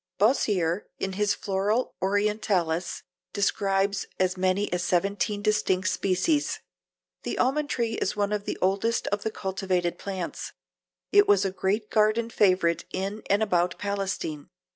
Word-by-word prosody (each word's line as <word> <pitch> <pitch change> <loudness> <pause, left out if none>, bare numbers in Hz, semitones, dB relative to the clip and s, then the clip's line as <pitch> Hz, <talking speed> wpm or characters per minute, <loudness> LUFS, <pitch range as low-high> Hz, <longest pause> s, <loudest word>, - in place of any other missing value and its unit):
Boissier 200 -5 +2
in 195 0 -3
his 205 +1 +1
Flora 205 +5 0 0.2
Orientalis 195 -4 0 0.3
describes 200 -1 +1
as 185 0 +2
many 185 +1 0
as 180 0 0
seventeen 200 +3 0
distinct 210 -3 +1
species. 200 - +1 0.6
The - - -4
almond 285 +3 +1
tree 230 -4 -1
is - - 0
one 205 0 0
of 210 -1 -2
the - - -3
oldest 200 +5 +1
of 205 0 -1
the 220 - -1
cultivated 190 -4 -2
plants. 190 -3 -5 0.6
It 410 0 +6
was 410 - +4
a 190 - 0
great 205 +3 -1
garden 220 +2 +2
favorite 185 -5 +3
in 195 +3 -3
and 205 +2 +3
about 180 -4 +1
Palestine. 195 -7 -3
200 Hz, 140 wpm, -26 LUFS, 185-210 Hz, 0.6 s, It